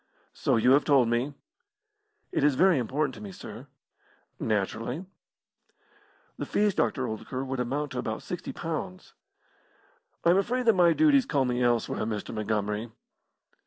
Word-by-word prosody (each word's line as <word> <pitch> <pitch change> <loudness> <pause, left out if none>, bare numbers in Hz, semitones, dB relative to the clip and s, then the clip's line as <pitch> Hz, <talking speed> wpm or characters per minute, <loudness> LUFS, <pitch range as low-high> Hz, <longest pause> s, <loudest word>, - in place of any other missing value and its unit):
"So - - +1
you 115 +3 +4
have 140 +2 +5
told 135 -5 +4
me." 125 +5 -1 1.0
"It - - 0
is 145 -2 +4
very 185 -1 +4
important 135 +4 -1
to 110 - -11
me, 100 -2 -7
sir." - - -10 0.7
"Naturally." 115 - -2 1.3
"The - - -2
fees, 205 -1 +2
Dr. 130 -6 0
Oldacre, 130 +4 -4
would 135 -1 -3
amount 140 +4 -2
to 125 - -3
about - - -4
sixty - - -5
pounds." 90 0 -5 1.1
"I 170 - +6
am 180 - +4
afraid 245 +5 -1
that 225 - +6
my 175 -3 +5
duties 285 - +4
call 140 -4 +1
me 125 0 -1
elsewhere, 120 -2 +1
Mr. 105 -1 -4
Montgomery." 105 +1 -2
130 Hz, 150 wpm, -28 LUFS, 115-155 Hz, 1.3 s, I